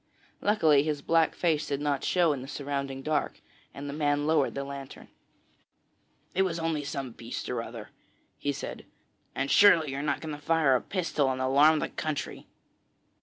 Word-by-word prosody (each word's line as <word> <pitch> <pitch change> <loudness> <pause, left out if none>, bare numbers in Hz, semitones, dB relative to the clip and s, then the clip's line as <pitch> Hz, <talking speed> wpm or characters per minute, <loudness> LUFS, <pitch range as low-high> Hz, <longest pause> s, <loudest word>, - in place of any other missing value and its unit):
Luckily 160 -9 +4
his 150 -1 -2
black 165 -1 +2
face 160 -4 0
did 140 -1 -2
not 145 -2 -1
show 175 -4 +3
in 135 - -5
the 130 - -8
surrounding 140 -1 -4
dark, 155 0 -1 0.3
and 140 +1 -8
the 140 - -5
man 145 -1 0
lowered 155 -3 +2
the 140 - -2
lantern. 140 -1 -9 1.2
'It 190 - +2
was 180 -3 0
only 165 -2 -1
some 140 -3 -4
beast 115 +1 -7
or 120 -2 -1
other,' 115 -2 -9 0.5
he 145 - -1
said, 140 - -7 0.5
'and 135 +1 -1
surely 170 -8 +6
you 135 - -4
are - - -2
not 145 -1 -1
going 155 -1 -6
to 145 - -8
fire 150 -3 +3
a 125 - +1
pistol 165 -7 -1
and 130 - -3
alarm 140 +4 +5
the - - -2
country?' 155 -2 -4
145 Hz, 180 wpm, -28 LUFS, 140-160 Hz, 1.2 s, surely